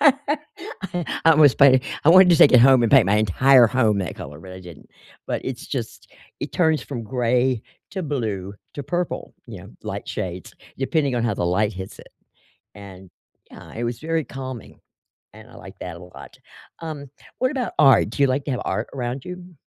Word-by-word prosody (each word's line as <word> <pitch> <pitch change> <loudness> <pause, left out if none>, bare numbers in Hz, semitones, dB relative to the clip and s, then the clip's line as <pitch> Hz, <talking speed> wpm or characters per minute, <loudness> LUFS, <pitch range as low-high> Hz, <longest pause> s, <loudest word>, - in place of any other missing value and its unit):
I 285 - -2
I 160 - +7
was 145 -3 +6
planning 130 -2 +6 0.2
I - - +4
wanted 185 0 +7
to 170 - +5
take 145 - +6
it 125 - +7
home 130 -1 +6
and 115 - +1
paint 135 -6 +7
my 105 +2 +2
entire 120 +5 +5
home 110 -4 +1
that 90 -5 -4
color, 75 +2 -10
but 95 +2 -11
I 95 - -10
didn't. 85 -4 -14 0.4
But - - -3
it's - - -6
just, - - -6 0.3
it - - -5
turns 160 -3 +1
from 120 -5 -6
gray 125 0 0 0.3
to 190 -2 -4
blue 105 - -4 0.2
to 145 - -5
purple, 175 +5 -4
you - - -9
know, - - -13
light - - -6
shades, 90 -1 -6 0.2
depending 140 -1 0
on 120 -1 -1
how 110 -3 0
the 90 - -2
light 105 +4 0
hits 95 0 -9
it, - - -14 0.7
and 95 -2 -12 0.4
yeah, - - -13
it 115 - -4
was 120 0 -3
very 160 0 -2
calming, 130 -4 -9 0.6
and - - -14
I - - -17
like - - -13
that 90 -2 -7
a - - -11
lot. 90 - -13 0.4
Um, 150 -4 -7 0.3
what 255 0 +1
about 260 -4 -3
art? 135 -7 +5
Do 140 - -2
you - - +6
like 135 +2 -1
to 145 - -4
have 125 - -3
art 105 +4 -3
around 125 0 -4
you? 180 -1 -10
130 Hz, 200 wpm, -22 LUFS, 105-155 Hz, 0.7 s, I